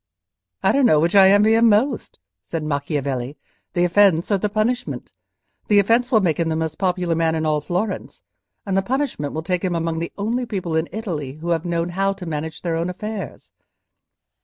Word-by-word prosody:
"I - - +4
don't 275 -2 +4
know 155 - +4
which 165 +2 +1
I 195 -1 +7
envy 205 +2 +5
him 230 +1 +5
most," 220 +7 +1 0.2
said 165 -2 -5
Macchiavelli, 140 -3 -2 0.4
"the 175 - +2
offence 180 -1 +3
or 200 - +3
the 210 - -1
punishment. 220 +4 -2 0.6
The 205 - +4
offence 230 +6 +3
will 220 -3 +5
make 170 -4 0
him 165 -1 +1
the 160 - 0
most 160 -1 -3
popular 180 -2 0
man 165 0 +1
in 160 0 -1
all 150 -1 +1
Florence, 185 +4 -3 0.4
and 195 -2 -1
the 195 - +3
punishment 250 - -2
will 160 - -3
take 180 +2 -1
him 180 -2 0
among 165 -1 -1
the 170 - -4
only 235 +5 -1
people 185 -7 -3
in 160 +1 0
Italy 165 - -4
who 160 +4 -7
have 165 0 0
known 170 0 -1
how 195 +2 0
to 185 - -9
manage 160 0 -5
their 170 -2 -1
own 165 +2 -1
affairs." 210 +3 -6
175 Hz, 200 wpm, -21 LUFS, 160-205 Hz, 0.6 s, I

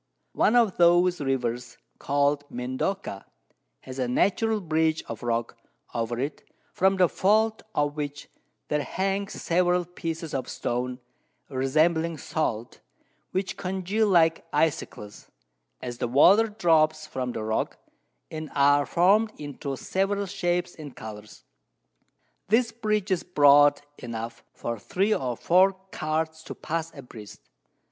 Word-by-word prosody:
One 220 - +3
of 230 -5 +3
those 175 0 +4
Rivers, 125 -3 -2 0.2
call'd 145 +1 +1
Mendoca, 130 - -3 0.6
has 130 0 -9
a 125 - 0
natural 215 - +1
Bridge 160 -3 0
of 115 -2 -8
Rock 115 -1 -2 0.4
over 115 0 -2
it, 140 +4 -3 0.3
from 190 +1 +2
the 185 - +6
Vault 215 +5 +2
of 145 0 0
which 145 -1 -5 0.4
there 150 0 +1
hangs 195 +7 -2
several 180 0 +1
Pieces 165 -2 -5
of 135 -2 -3
Stone, 125 +1 -3 0.5
resembling 155 +5 +1
Salt, 120 -8 -3 0.5
which 190 +1 -3
congeal 190 +3 -1
like 165 -4 +3
Icecles, 145 -9 -2 0.5
as 120 -1 -6
the - - -1
Water 185 - +6
drops 155 -7 +2
from 130 -4 -4
the 110 - -4
Rock, 110 0 -2 0.5
and 155 -1 -6
are 145 0 +4
form'd 205 +6 +3
into 145 -1 -5
several 200 +5 -1
Shapes 180 -2 -1
and 145 -5 -10
Colours. 105 -1 -10 1.0
This 230 +3 +3
Bridge 215 -3 -1
is 185 - +2
broad 145 -3 +5 0.2
enough 115 -1 -6
for 115 -1 -5
3 195 - 0
or 125 - -2
4 185 +3 +4 0.2
Carts 160 +1 -2
to - - -7
pass 165 0 -3
a 140 - -9
breast. 105 - -12
155 Hz, 130 wpm, -26 LUFS, 130-185 Hz, 1.0 s, the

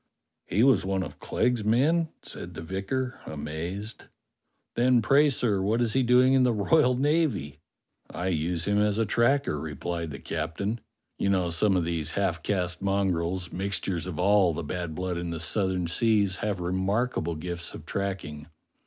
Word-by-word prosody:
"He 105 +6 +2
was 125 -8 +5
one 95 0 -1
of 80 - -9
Clegg's 120 -3 0
men.? 150 +10 +2
" - - -47
said 90 -1 -6
the 80 - -6
vicar, 110 +9 -3
amazed. 80 +8 -5 0.7
"Then 125 +1 +4
pray, 140 +6 +4
sir, 110 -7 +1
what 105 +5 +1
is 115 -2 +1
he 130 - +3
doing 125 +1 +5
in 135 - +4
the 125 -1 +4
royal 125 +4 +3
navy.^^ 135 - 0 0.3
" - - -52
"I 90 +2 -3
use 85 0 -1
him 100 0 +2
as 105 0 +2
tracker," 120 - +1
replied 80 +3 -4
the 70 - -6
captain. 100 - -3 0.4
"You 100 - +1
know, 90 -3 +1
some 95 +4 +2
of 85 - 0
these 85 -3 -2
half - - 0
caste 90 -4 -1
mongrels, 95 -3 -1
mixtures 95 -2 -2
of 85 -4 -5
all 95 -2 +3
the - - -4
bad 85 0 -4
blood 90 0 -2
in 85 0 -4
the 85 -1 -4
Southern 95 +2 0
Seas, 100 +1 +2
have 105 -3 -2
remarkable 95 0 -1
gifts 85 +2 -5
of - - -10
tracking. 95 -7 -4
95 Hz, 170 wpm, -27 LUFS, 85-115 Hz, 0.7 s, was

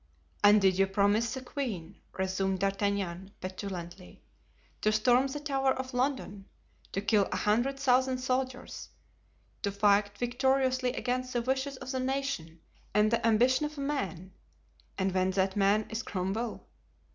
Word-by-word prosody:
"And 205 +1 +8
did 190 -1 +3
you 195 - +4
promise 205 +4 +2
the 260 - -5
queen," 240 - -5 0.2
resumed 190 0 0
D'Artagnan, 195 -1 -1
petulantly, 185 -1 -7 0.6
"to 215 - +3
storm 245 +5 +3
the 285 +2 -5
Tower 270 -2 +1
of 260 0 -6
London, 250 -6 -2 0.5
to 195 - -2
kill 205 -1 +3
a - - -1
hundred 240 +6 +1
thousand 260 -1 +3
soldiers, 255 0 -3 0.7
to 200 - -1
fight 205 0 +2
victoriously 255 +1 +1
against 255 0 -2
the 240 -1 0
wishes 265 +2 -1
of 255 - -6
the 260 - -1
nation 255 -12 -3 0.3
and 210 +1 +4
the 235 - +1
ambition 255 +6 +3
of 300 0 -12
a - - -4
man, 190 - -3 0.7
and 190 -1 +1
when 185 0 +2
that 190 0 0
man 205 +1 +3
is 225 +1 -2
Cromwell? 210 +3 -3
215 Hz, 145 wpm, -30 LUFS, 195-260 Hz, 0.7 s, And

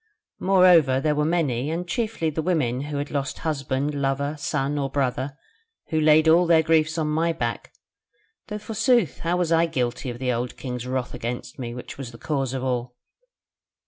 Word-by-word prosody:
Moreover, 180 -8 +5
there 150 +2 +1
were 150 0 +1
many, 150 -6 0
and 170 +2 -3
chiefly 215 -7 -1
the 160 - -2
women 150 -8 0
who 150 -1 -4
had 145 +1 -4
lost 140 -1 -2
husband, 140 -1 -1
lover, 140 +1 -1
son 145 0 -1
or 135 -1 -1
brother, 135 0 -2 0.5
who 160 -2 +1
laid 155 +1 +5
all 170 +2 +5
their 165 -1 +5
griefs 160 0 +2
on 155 -2 0
my 160 +2 +1
back; 120 -8 -3 0.8
though 210 - -4
forsooth 225 - +1
how 170 +1 0
was 175 -2 0
I 165 +1 +4
guilty 125 -4 -2
of 120 - -5
the 125 0 -1
old 120 +1 -3
king's 125 -2 -5
wrath 130 -1 -2
against 125 +1 -5
me, 120 -2 -5
which 125 - -9
was 130 -4 -6
the 115 - -12
cause 135 -2 -2
of 130 - -3
all? 125 -1 -2
145 Hz, 185 wpm, -24 LUFS, 130-165 Hz, 0.8 s, Moreover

